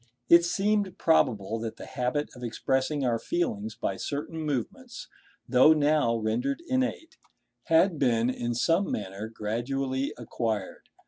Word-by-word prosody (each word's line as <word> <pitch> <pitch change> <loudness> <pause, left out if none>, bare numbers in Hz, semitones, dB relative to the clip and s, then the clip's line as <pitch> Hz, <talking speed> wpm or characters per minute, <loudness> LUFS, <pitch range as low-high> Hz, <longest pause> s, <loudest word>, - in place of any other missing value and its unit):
It 170 0 +8
seemed 200 +1 0
probable 115 - +2
that 115 -1 -5
the - - -9
habit 125 +4 -2
of 125 - -10
expressing 130 +4 -1
our 115 -2 +1
feelings 110 -12 -2
by 95 -5 -3
certain 150 +6 -4
movements, 155 - -4 0.4
though 130 +5 +6
now 150 -5 +2
rendered 115 - -1
innate, 260 +5 -2 0.5
had 165 0 +3
been 120 -3 +2
in 120 -1 -3
some 165 +10 +1
manner 100 +1 -4
gradually 130 +5 -2
acquired. 110 -4 -4
130 Hz, 130 wpm, -27 LUFS, 115-165 Hz, 0.5 s, It